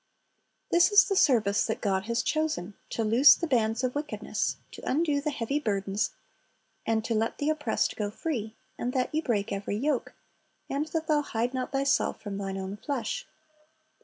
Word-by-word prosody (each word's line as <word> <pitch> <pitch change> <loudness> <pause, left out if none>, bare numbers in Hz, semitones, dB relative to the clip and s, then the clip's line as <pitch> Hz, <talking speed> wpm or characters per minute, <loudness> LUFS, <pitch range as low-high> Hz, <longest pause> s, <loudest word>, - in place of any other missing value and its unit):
"^ - - -46 0.7
This 345 +5 +5
is 410 0 +7
the 395 - 0
service 220 - +3
that 220 - -2
God 190 -2 0
has 235 +1 0
chosen, 300 - -1
— - - -38
"to 225 - -1
loose 250 +5 +7
the 340 - -3
bands 230 -4 +1
of 255 -1 0
wickedness, 295 +1 -2
to - - -10
undo 295 0 +1
the 300 - -1
heavy 275 +1 -1
burdens, 200 -5 -1 0.8
and 220 -1 +1
to 230 - 0
let 225 +1 0
the 290 +2 +1
oppressed 295 -7 0
go 210 -1 -1
free, 220 -3 -4 0.2
and 245 +1 -2
that 255 +1 0
ye 310 - +1
break 210 -9 -1
every 200 +1 -3
yoke, 275 +2 -1 0.6
and 285 +3 -1
that 320 +1 -2
thou 305 -1 +2
hide 240 -2 -2
not 255 -1 -3
thyself 275 0 +1
from 200 -2 -5
thine 195 -1 -3
own 190 +1 -5
flesh." 250 -3 -3
245 Hz, 190 wpm, -28 LUFS, 215-295 Hz, 0.8 s, is